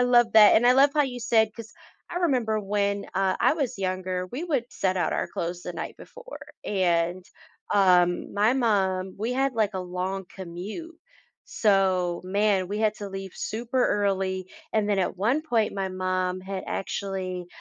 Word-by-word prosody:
love 240 -2 +4
that. 210 -2 +8
And 240 - +4
I - - +7
love 275 +2 +5
how 300 - +4
you 255 -3 -4
said, 225 -1 +3
'cause 230 -1 -10 0.4
I 350 - -5
remember 245 -11 +1
when, 200 0 -1
uh, 190 -1 +2
I - - +4
was 275 -10 -2
younger, 185 -1 -2
we 270 - -5
would 280 -9 0
set 190 -1 -1
out 175 - 0
our - - -1
clothes 175 +1 -4
the 180 - -5
night 170 - -6
before. - - -11 0.3
And, 175 -2 0 0.5
um, 180 -3 +3
my 210 +3 +3
mom, 190 -6 +1
we 225 +4 -1
had 270 0 0
like 215 -2 +1
a 190 - -2
long 185 +2 -4
commute, 195 - -7 0.5
so 190 -4 +2
man, 195 -1 +1
we 205 +2 -3
had 215 -1 +2
to 205 - -6
leave 195 -1 -7
super 240 +3 -2
early, 190 -2 0 0.3
and 215 -2 +1
then, 205 -1 +1
at 185 0 -1
one 230 +10 +1
point, 230 -9 +1
my 195 -1 -2
mom 185 0 -2
had 190 0 -5
actually, 185 -2 -4
200 Hz, 175 wpm, -26 LUFS, 185-230 Hz, 0.5 s, that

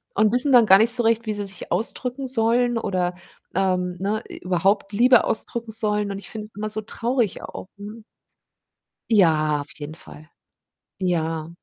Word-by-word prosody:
und 215 0 +3
wissen 250 +3 +4
dann 245 -3 +7
gar 190 -2 +8
nicht 225 +2 +5
so 240 0 0
recht, 230 +1 +2
wie 215 - 0
sie 205 -1 -4
sich 195 -1 -4
ausdrücken 250 +7 -2
sollen 240 0 +1
oder, 185 -5 -1 0.4
ähm, 180 -1 0
ne, 210 +3 -1
i - - -9
überhaupt 195 +3 0
Liebe 245 +3 +5
ausdrücken 230 0 -3
sollen 210 -2 -1
und 195 - -5
ich 200 - -9
finde 215 -1 -7
es 215 - -29
immer 215 +1 -3
so 215 0 -3
traurig 235 0 -2
auch, - - -8
ne? 210 +2 -10 1.1
Ja, 155 -8 +3
auf 145 - -11
jeden 150 +1 -7
Fall. 155 -1 -14 0.7
Ja. 165 -3 -1
210 Hz, 175 wpm, -23 LUFS, 180-230 Hz, 1.1 s, gar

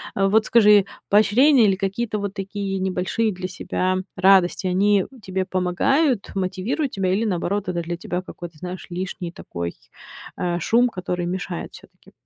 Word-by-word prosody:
Вот 200 +2 +3
скажи, 210 -4 +6 0.2
поощрения 235 +5 +5
или 195 - +3
какие-то 210 +4 -2
вот 200 -1 -4
такие 195 -1 -4
небольшие 190 +4 0
для 185 -1 -5
себя 185 0 -2 0.2
радости, 190 0 +4
они 195 +2 +3 0.2
тебе 190 -1 -2
помогают, 200 - +1
мотивируют 195 - -2
тебя 190 -2 0
или 205 +4 +1
наоборот 195 0 -1
это 175 -1 -1
для 170 +1 -4
тебя 180 +1 -3
какой-то, 175 -3 -10
знаешь, 180 +3 -7
лишний 180 0 -5
такой, 85 - -6 0.6
э, 175 -1 -1
шум, 240 +8 +3
который 180 -3 -3
мешает 180 -1 -4
всё-таки? - - -17
190 Hz, 145 wpm, -22 LUFS, 180-205 Hz, 0.6 s, скажи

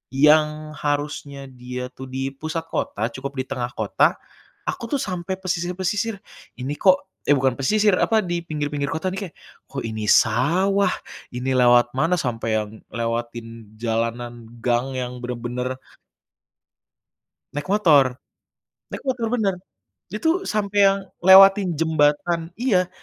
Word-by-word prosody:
yang 150 +1 +3
harusnya 145 -1 -3
dia 125 0 -6
tuh 130 0 -9
di 135 +1 -3
pusat 155 +4 -4
kota 115 +3 -2
cukup 140 +3 -6
di 130 - -1
tengah 125 -2 -4
kota, 110 -2 +2 0.5
aku 235 +4 -3
tuh 270 - -1
sampai 185 -1 -3
pesisir-pesisir, 185 +3 -2 0.3
ini 130 +4 -5
kok 185 -1 +4 0.2
eh 145 - +6
bukan 135 -1 +2
pesisir, 205 +7 +3
apa, 220 -2 +3
di 175 -1 -2
pinggir-pinggir 145 -3 -3
kota 160 +4 -2
ini 195 - -4
kayak, - - -33 0.3
kok 135 - -5
ini 110 -1 -4
sawah, 175 - +3 0.5
ini 125 +2 -2
lewat 120 -1 +5
mana 165 +7 +2
sampai 115 -6 -1
yang 105 -1 -2 0.2
lewatin 115 -1 -5
jalanan 115 +1 -3 0.2
gang 125 +2 0
yang 125 0 -4
bener-bener 125 +1 -4 1.8
Naik 145 0 -4
motor. 145 -11 +4 0.7
Naik - - -6
motor 255 -4 -1
bener, 200 -5 +1 0.6
itu 325 - 0
sampai 205 - -1
yang 195 - +3 0.3
lewatin 195 0 +8
jembatan 165 +2 +1
iya, 185 -8 +2
145 Hz, 130 wpm, -22 LUFS, 125-185 Hz, 1.8 s, lewatin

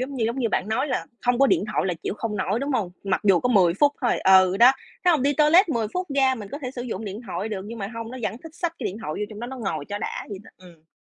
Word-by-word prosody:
giống 270 +2 -4
như, 235 -4 -1
giống 235 +4 -2
như, 235 -3 +1
bạn 205 - -1
nói 250 +6 0
là - - -1 0.2
hông 245 0 +3
có 275 - +6
điện 205 - +2
thoại - - 0
là 180 - 0
chịu - - -3
không 215 -1 -3
nổi, 190 +3 0
đúng 280 +1 -2
hông? 205 -8 -1
Mặc 195 -1 0
dù 190 -4 +5
có 250 - 0
10 185 -7 +4
phút 285 +7 +3
thôi. 245 -3 +1
Ừ, 190 0 +5
đó, 245 +4 +7 0.3
thấy 355 - +6
hông? 295 -6 +1
Đi 285 - +3
toilet 310 +7 +5
10 230 -8 0
phút 365 0 -1
ra 265 -1 +3
mình 210 -5 -8
có 285 - -6
thể 255 -4 -5
sử 250 -2 -6
dụng 225 -3 -5
điện 205 +1 -6
thoại 185 +3 -4
được, 205 -3 -4
nhưng 230 +1 -7
mà 195 -1 -4
hông, 230 0 -6
nó 255 - -7
vẫn 220 - -2
thích 325 -1 -11
xách 345 -1 -2
cái - - -6
điện 190 - -3
thoại 150 - -4
vô - - -2
trong 215 - -9
đó 240 - -4
nó 265 +2 -7
ngồi 160 -9 -3
cho 205 - -3
đã - - -5
vậy 200 -2 -6
đó. - - -15
Ừm. 170 -3 -18
230 Hz, 325 wpm, -24 LUFS, 195-265 Hz, 0.3 s, đó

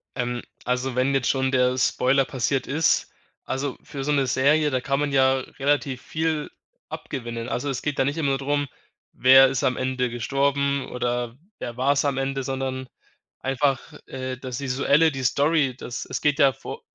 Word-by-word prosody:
Ähm, 120 -1 -2 0.2
also, 125 0 -1
wenn 130 +2 +2
jetzt 135 -3 +1
schon 130 -1 +1
der 125 -1 +2
Spoiler 130 +1 +2
passiert 130 +1 -1
ist, 155 +4 +1 0.3
also, 135 0 -3
für 140 -2 -6
so 150 - 0
'ne 140 -2 +2
Serie, 150 +4 +3
da 130 -1 0
kann 140 +2 0
man 145 -1 0
ja 135 -1 +4 0.2
relativ 140 -2 0
viel 160 -1 -2 0.4
abgewinnen. 120 -2 -5
Also, 140 +4 -2
es 135 -2 -3
geht 150 -2 -2
da - - +3
nicht 140 +3 -1
immer 150 -4 +1
nur 135 - +1
drum, 145 +1 0 0.5
wer 130 +1 +7
ist 135 +1 -2
am 130 -2 +1
Ende 130 -1 -1
gestorben 140 +3 0
oder 120 -1 -2 0.2
wer 120 0 -6
war's 140 +2 +2
am 140 -2 0
Ende, 135 0 -1
sondern 130 0 -3 0.5
einfach, 135 0 +1 0.3
äh, 130 -1 -5
das 130 0 -6
visuelle, 140 +4 +3
die 135 -2 -5
Story, 140 0 +2
das 125 - -6
es - - -4
geht 145 0 +1
ja 135 -2 +5
vo - - -8
135 Hz, 180 wpm, -24 LUFS, 130-140 Hz, 0.5 s, wer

